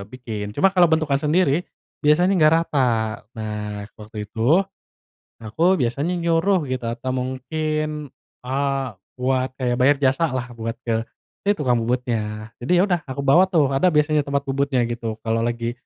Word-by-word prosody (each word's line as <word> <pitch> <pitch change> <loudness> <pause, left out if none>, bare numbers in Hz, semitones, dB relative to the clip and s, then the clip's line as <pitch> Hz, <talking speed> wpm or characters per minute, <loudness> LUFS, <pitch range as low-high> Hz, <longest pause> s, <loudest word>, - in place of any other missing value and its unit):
bikin. 110 -4 -6
Cuma 195 0 +4
kalau 180 -3 +5
bentukan 155 -4 +1
sendiri 160 +1 +1 0.3
biasanya 175 +6 +4
enggak 155 0 +6
rata. 115 -6 0 0.2
Nah 105 -1 -5 0.2
waktu 105 0 -7
itu, 125 - +2 0.8
nah 110 - -8
aku 170 - +2
biasanya 140 +8 0
nyuruh 170 +2 +2
gitu 130 -2 -3
atau 120 +2 -6
mungkin, 150 +3 -3 0.3
eee, 135 +1 -1 0.3
buat 130 0 0
kayak 125 -2 0
bayar 140 +3 +5
jasalah 130 -3 0
buat 115 0 -5
ke, 115 - -1 0.6
ya - - +6
tukang 125 -6 +1
bubutnya. 115 -3 -2
Jadi 125 - -1
ya - - +5
udah 180 -4 +1
aku 140 +1 -4
bawa 175 +8 +5
tuh, 150 -7 +2
ada 135 +7 +3
biasanya 150 -1 +3
tempat 140 0 -2
bubutnya 135 -2 0
gitu 115 -2 -4
kalau 115 0 0
lagi 120 0 -1
135 Hz, 155 wpm, -22 LUFS, 115-155 Hz, 0.8 s, enggak